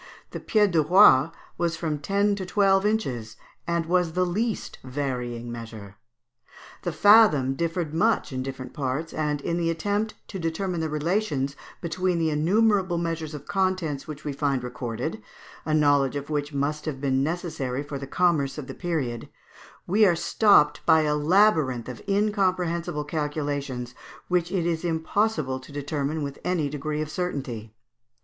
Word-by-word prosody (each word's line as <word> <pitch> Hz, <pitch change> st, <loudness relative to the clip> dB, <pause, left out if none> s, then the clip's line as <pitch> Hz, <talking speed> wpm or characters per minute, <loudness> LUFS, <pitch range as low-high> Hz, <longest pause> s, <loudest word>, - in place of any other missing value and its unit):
The -, -, -5 dB
pied 210 Hz, -3 st, +2 dB
de 165 Hz, -2 st, +4 dB
roi 155 Hz, -3 st, +6 dB, 0.3 s
was 170 Hz, -1 st, 0 dB
from 155 Hz, -3 st, -2 dB
ten 200 Hz, +5 st, +1 dB
to 200 Hz, -1 st, -3 dB
twelve 195 Hz, +1 st, +3 dB
inches, 125 Hz, -, -2 dB, 0.3 s
and 170 Hz, -1 st, 0 dB
was 175 Hz, -1 st, +1 dB
the 180 Hz, +1 st, +2 dB
least 215 Hz, +5 st, -2 dB
varying 125 Hz, -3 st, -4 dB
measure. 110 Hz, -4 st, -9 dB, 0.9 s
The -, -, -2 dB
fathom 205 Hz, -, +5 dB
differed 165 Hz, +1 st, -2 dB
much 195 Hz, -4 st, +1 dB
in 130 Hz, -, -2 dB
different 130 Hz, -1 st, -6 dB
parts, 140 Hz, +4 st, -3 dB
and 150 Hz, -2 st, -1 dB
in 170 Hz, +4 st, -1 dB
the 170 Hz, -1 st, 0 dB
attempt 205 Hz, +6 st, -1 dB
to 195 Hz, -, -5 dB
determine 170 Hz, +2 st, -2 dB
the 160 Hz, -, -1 dB
relations 150 Hz, -3 st, -1 dB, 0.3 s
between 180 Hz, +1 st, -1 dB
the 160 Hz, -1 st, +1 dB
innumerable 190 Hz, +3 st, +2 dB
measures 165 Hz, -2 st, -3 dB
of 145 Hz, -1 st, -9 dB
contents 185 Hz, -7 st, -1 dB
which 155 Hz, -1 st, -8 dB
we 145 Hz, -, -2 dB
find 135 Hz, -2 st, 0 dB
recorded 120 Hz, -2 st, -4 dB, 0.4 s
a 155 Hz, -, -1 dB
knowledge 145 Hz, -3 st, +3 dB
of 145 Hz, +1 st, -5 dB
which 145 Hz, 0 st, -1 dB
must 145 Hz, +2 st, -2 dB
have 150 Hz, -4 st, -4 dB
been 135 Hz, -1 st, +1 dB
necessary 145 Hz, -4 st, -2 dB
for 145 Hz, -1 st, -6 dB
the 140 Hz, -, -7 dB
commerce 155 Hz, -4 st, +1 dB
of 150 Hz, -, -5 dB
the -, -, -7 dB
period 145 Hz, -10 st, -3 dB, 0.6 s
we 205 Hz, +5 st, +3 dB
are 185 Hz, -4 st, +5 dB
stopped 170 Hz, -3 st, +4 dB
by 160 Hz, -, +6 dB
a 150 Hz, -1 st, +1 dB
labyrinth 150 Hz, -, +3 dB
of 125 Hz, -2 st, -7 dB
incomprehensible 185 Hz, -6 st, 0 dB
calculations, 145 Hz, -5 st, -3 dB, 0.4 s
which 175 Hz, -1 st, +1 dB
it 180 Hz, -4 st, 0 dB
is 165 Hz, -1 st, -1 dB
impossible 160 Hz, -4 st, 0 dB
to 130 Hz, -, -14 dB
determine 145 Hz, +1 st, -2 dB
with 140 Hz, 0 st, -6 dB
any 170 Hz, -5 st, 0 dB
degree 150 Hz, +1 st, -3 dB
of 155 Hz, -, -8 dB
certainty. 130 Hz, -, -4 dB
155 Hz, 160 wpm, -25 LUFS, 140-180 Hz, 0.9 s, roi